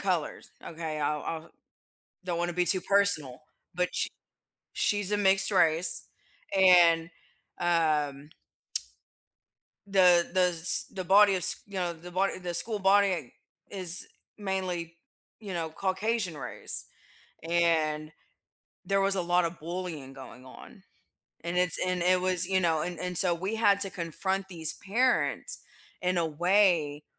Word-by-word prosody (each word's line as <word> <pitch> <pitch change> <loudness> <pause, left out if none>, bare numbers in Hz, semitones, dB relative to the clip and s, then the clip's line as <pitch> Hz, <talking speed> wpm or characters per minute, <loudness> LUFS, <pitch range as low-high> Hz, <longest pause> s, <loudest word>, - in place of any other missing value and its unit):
colors, 180 -6 -3
okay, 160 -2 -6
I'll 150 0 -2
I'll 165 0 -6 0.7
don't 175 -2 -3
wanna 175 0 -2
be 180 +1 0
too 185 0 +3
personal, 195 -11 +1 0.3
but 180 +1 -1
she - - -1 0.7
she's 205 -1 0
a - - +2
mixed 195 -1 +2
race, 165 -3 +3 0.5
and, 175 -3 +5 0.5
um 150 -4 -1 1.6
the 180 -3 +4
the 185 - +1
s 165 +2 +3
the 185 -2 -6
body 200 +2 +5
is, 180 -3 +6
you 200 - -15
know, 180 -2 -2
the 170 +2 -12
body 190 +2 -1
the 180 -1 -6
school 210 +5 +2
body, 200 +1 +3
eh, 170 -8 -3 0.4
is 185 -2 +2 0.3
mainly, 185 -4 -4 0.4
you 200 -4 -7
know, 165 -2 -4
Caucasian 190 +1 -2
race, 130 -4 0 0.6
and 160 -3 0 0.8
there 195 0 +1
was 195 0 +4
a 190 - -1
lotta 175 0 +1
bullying 165 -4 -7
going 130 -1 -13
on, 190 - -15 0.6
and 170 +1 -2
it's 180 -2 +1
and 180 -1 -2
it 180 +1 +2
was, 185 -1 +1
you 190 0 +1
know, 165 -3 0
and 175 +1 -5
and 180 0 +2
so 180 -2 +4
we 190 +6 -4
had 200 -3 +2
to 195 - +2
confront 190 +3 -4
these 165 -4 0
parents 240 +6 -1 0.4
in 180 0 -1
a 170 - 0
way 165 -3 +1
180 Hz, 140 wpm, -27 LUFS, 165-190 Hz, 1.6 s, is